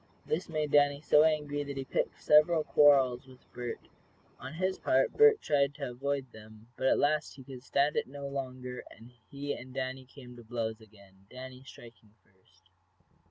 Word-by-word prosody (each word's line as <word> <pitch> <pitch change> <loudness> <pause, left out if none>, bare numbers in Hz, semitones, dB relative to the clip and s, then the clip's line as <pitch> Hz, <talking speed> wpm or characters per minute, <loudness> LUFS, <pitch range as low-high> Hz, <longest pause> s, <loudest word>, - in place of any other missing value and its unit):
This 165 +4 -2
made 155 -2 -2
Danny 145 -1 +4
so 150 0 +4
angry 150 -2 0
that 140 -1 -7
he 135 - -4
picked - - -2
several 155 +2 +4
quarrels 135 -5 +4
with 130 -1 -17
Bert. 120 -1 -6 0.5
On 130 +3 -8
his 185 +3 -2
part 135 +1 +2
Bert 445 -1 +5
tried 140 -1 +1
to 140 -4 -5
avoid 140 +2 -3
them, 110 +1 -15
but 130 - -1
at - - +4
last 150 +1 0
he 135 - -12
could 130 -1 -10
stand 140 +3 +1
it - - -1
no 140 +1 -7
longer, 130 -2 -6
and 115 +2 -15 0.2
he 140 +1 -4
and 130 +1 -10
Danny 130 0 -4
came 125 -1 -13
to 120 - -12
blows 110 -1 -4
again, 100 -3 -20
Danny 130 0 -10
striking 115 -5 -15
first. 95 -1 -31
135 Hz, 180 wpm, -30 LUFS, 125-145 Hz, 0.5 s, Bert